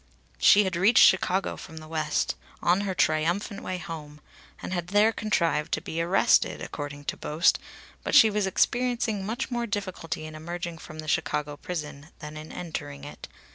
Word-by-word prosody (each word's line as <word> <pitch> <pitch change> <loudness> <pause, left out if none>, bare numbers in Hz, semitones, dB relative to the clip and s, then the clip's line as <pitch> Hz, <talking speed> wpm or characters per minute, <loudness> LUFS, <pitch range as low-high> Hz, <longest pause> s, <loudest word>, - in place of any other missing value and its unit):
She 210 - +7
had 190 -3 -2
reached 200 +8 +6
Chicago 190 0 +2
from 160 - -11
the 155 0 -9
West, 155 -1 -1 0.3
on 180 +3 +2
her 195 -2 -2
triumphant 175 +6 0
way 185 - -3
home, 155 -3 -8 0.4
and - - -5
had 175 -2 -2
there 205 +4 +4
contrived 170 -8 0
to - - +2
be 165 - -3
arrested, 175 +3 +3
according 145 -1 -6
to - - -3
boast, 155 +4 +2 0.4
but - - 0
she 220 - +8
was 205 -1 0
experiencing 235 -1 +1
much 225 +6 -3
more 240 -1 -1
difficulty 185 -6 -4
in 155 - -8
emerging 170 +1 -6
from 155 - -10
the 155 0 -7
Chicago 150 0 -1
prison 150 -2 -6
than 150 0 -9
in 155 +1 -9
entering 70 - -6
it. 75 +1 -9
170 Hz, 175 wpm, -27 LUFS, 155-195 Hz, 0.4 s, she